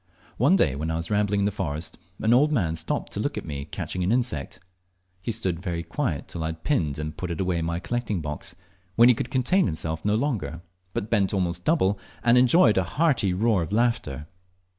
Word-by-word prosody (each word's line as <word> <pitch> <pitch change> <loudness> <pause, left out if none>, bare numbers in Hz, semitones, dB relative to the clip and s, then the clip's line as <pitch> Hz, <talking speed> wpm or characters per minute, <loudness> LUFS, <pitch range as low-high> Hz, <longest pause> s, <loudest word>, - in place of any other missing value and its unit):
One 140 - +4
day 75 - +2
when 80 +3 -3
I 80 - -1
was 85 +4 -4
rambling 105 -1 +2
in - - +2
the 105 - +1
forest, 80 -4 -4 0.2
an 110 +2 +3
old 145 +5 +4
man 90 - +1
stopped - - -3
to - - -3
look - - -2
at - - -4
me 70 -2 -5
catching 90 +3 -4
an 90 +3 +1
insect. 115 - -1 0.6
He 115 - -2
stood 95 -7 -2
very 85 -3 -3
quiet 85 - -2
till 85 - -6
I - - -1
had 80 0 -6
pinned 80 - 0
and 75 0 -4
put 90 - -5
it 85 - -4
away 90 -2 0
in 80 - -2
my 85 +1 -1
collecting 115 0 -2
box, 75 +1 -5 0.4
when 120 +1 +7
he - - +7
could 120 - -4
contain 135 - +2
himself 80 -1 -2
no 105 +1 +2
longer, 95 - -2 0.3
but 105 - -3
bent 100 -3 +2
almost 90 -2 -1
double, 105 - +2 0.2
and 120 0 +5
enjoyed 125 - +5
a - - +1
hearty 135 - +3
roar 100 +1 +2
of 85 - -4
laughter. 110 - 0
95 Hz, 220 wpm, -25 LUFS, 80-120 Hz, 0.6 s, when